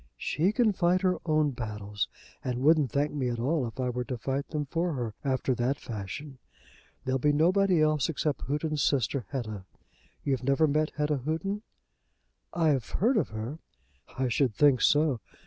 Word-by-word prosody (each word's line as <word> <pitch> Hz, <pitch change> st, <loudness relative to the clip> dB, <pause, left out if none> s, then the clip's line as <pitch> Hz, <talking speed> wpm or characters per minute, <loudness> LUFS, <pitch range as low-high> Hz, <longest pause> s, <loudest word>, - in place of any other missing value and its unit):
"She 170 Hz, -, +1 dB
can 220 Hz, -1 st, +3 dB
fight 180 Hz, 0 st, +2 dB
her 185 Hz, -1 st, +1 dB
own 155 Hz, -2 st, +3 dB
battles, 105 Hz, -4 st, -4 dB, 0.4 s
and 125 Hz, 0 st, -2 dB
wouldn't 150 Hz, -4 st, +4 dB
thank 145 Hz, +1 st, 0 dB
me 135 Hz, -4 st, -1 dB
at 120 Hz, -, -2 dB
all 130 Hz, +2 st, 0 dB
if 115 Hz, +3 st, -10 dB
I 125 Hz, -1 st, 0 dB
were 125 Hz, 0 st, -2 dB
to 125 Hz, -2 st, -4 dB
fight 135 Hz, +4 st, -2 dB
them 150 Hz, -2 st, -2 dB
for 170 Hz, +4 st, -1 dB
her 120 Hz, -5 st, -3 dB
after 130 Hz, -1 st, +1 dB
that 125 Hz, +4 st, 0 dB
fashion. 120 Hz, +6 st, -7 dB, 0.7 s
There'll 130 Hz, +1 st, 0 dB
be 145 Hz, +3 st, +3 dB
nobody 175 Hz, +3 st, +3 dB
else 155 Hz, 0 st, +2 dB
except 150 Hz, -2 st, -1 dB
Houghton's 150 Hz, +1 st, -1 dB
sister, 130 Hz, -4 st, +1 dB
Hetta. 110 Hz, -8 st, -4 dB, 0.6 s
You 140 Hz, -, +1 dB
never 140 Hz, +4 st, +3 dB
met 155 Hz, +1 st, +1 dB
Hetta 150 Hz, -1 st, 0 dB
Houghton?" 165 Hz, +9 st, -2 dB, 0.9 s
"I've 155 Hz, -8 st, +1 dB
heard 240 Hz, +7 st, +2 dB
of 215 Hz, -, +1 dB
her." 110 Hz, +8 st, -5 dB, 0.6 s
"I 130 Hz, 0 st, +1 dB
should 125 Hz, -2 st, +1 dB
think 140 Hz, -1 st, +4 dB
so. 150 Hz, -4 st, +3 dB
140 Hz, 170 wpm, -29 LUFS, 125-155 Hz, 0.9 s, wouldn't